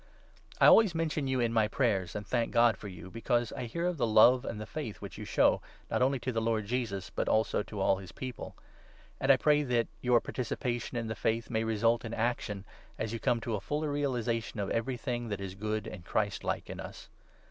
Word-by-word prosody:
I - - +6
always 210 -6 +7
mention 155 -3 -1
you 130 -1 0
in 115 -1 +1
my 110 -2 +3
prayers 100 -8 0
and 105 0 -4
thank 120 +2 0
God 115 -2 +5
4 - - -23
for 105 - -6
you, 90 -1 -9
because 120 +1 0
I - - -4
hear 170 +9 -3
of 180 -2 0
the 120 - +1
love 120 +4 +6
and 110 - -4
the 110 - -5
faith 115 -3 -6
which - - -8
5 - - -10
you - - -6
show, - - +3 0.3
not - - +1
only 135 +2 +3
to 130 - -2
the 115 -2 -1
Lord 110 -2 0
Jesus, 110 -4 -3
but - - -1
also 110 -1 +2
to 105 0 -7
all 95 0 +3
his 95 -2 -9
People; 130 -2 -7 0.6
and 135 - +4
I 135 - +6
pray 150 +2 +4
that 120 -4 +1 0.2
your 125 -1 +4
participation 120 0 -3
in 115 - -2
the 110 - -3
Faith 115 +1 0
6 - - -21
may 110 -1 +1
result 115 +1 +2
in 115 -1 -4
action, 110 -4 -2 0.3
as 110 0 -3
you 115 - -3
come 120 +2 +1
to 115 - -3
a 105 - -1
fuller 150 +5 -2
realization 120 -6 -1
of 100 -1 -2
everything 120 0 -2
that 100 -2 -3
is 95 -1 -5
good 110 +2 -3
and 85 - -8
Christlike 100 +3 -1
in - - -7
us. - - -9
115 Hz, 235 wpm, -31 LUFS, 110-125 Hz, 0.6 s, always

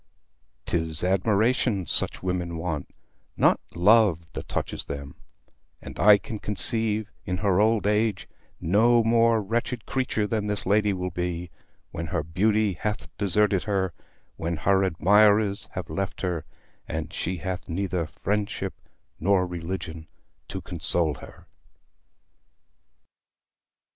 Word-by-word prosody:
'Tis 80 -1 +1
admiration 100 +2 +2
such - - 0
women 90 -2 -2
want, 80 -4 -3 0.5
not - - +4 0.2
love 95 -2 +4
that - - -6
touches - - -3
them; 70 -1 -6 0.7
and - - -10
I 105 0 +8
can 105 +1 -7
conceive, 110 0 -1
in 90 0 -2
her 100 -1 +2
old 110 -1 +2
age, 105 -1 +1 0.3
no 115 +7 +4
more 115 -1 +3
wretched 115 +2 -2
creature 130 -5 -1
than 105 0 -1
this 105 0 -3
lady 105 +1 +3
will 90 -1 -3
be, 90 0 -3 0.4
when 85 +1 -4
her 80 -2 -1
beauty 105 +5 +1
hath 105 +5 -4
deserted 100 0 +2
her, 95 -4 0 0.4
when 85 0 -2
her 95 +4 +3
admirers 100 +4 +3
have 90 - -5
left 95 -1 -4
her, 90 -5 -2 0.4
and 80 +1 -4
she 90 +1 -2
hath 90 +1 -5
neither 90 -1 -1
friendship 100 +6 -2 0.5
nor 95 +1 +3
religion 85 -2 -5 0.4
to - - -5
console 85 -3 0
her. - - -13
95 Hz, 125 wpm, -26 LUFS, 85-105 Hz, 0.7 s, I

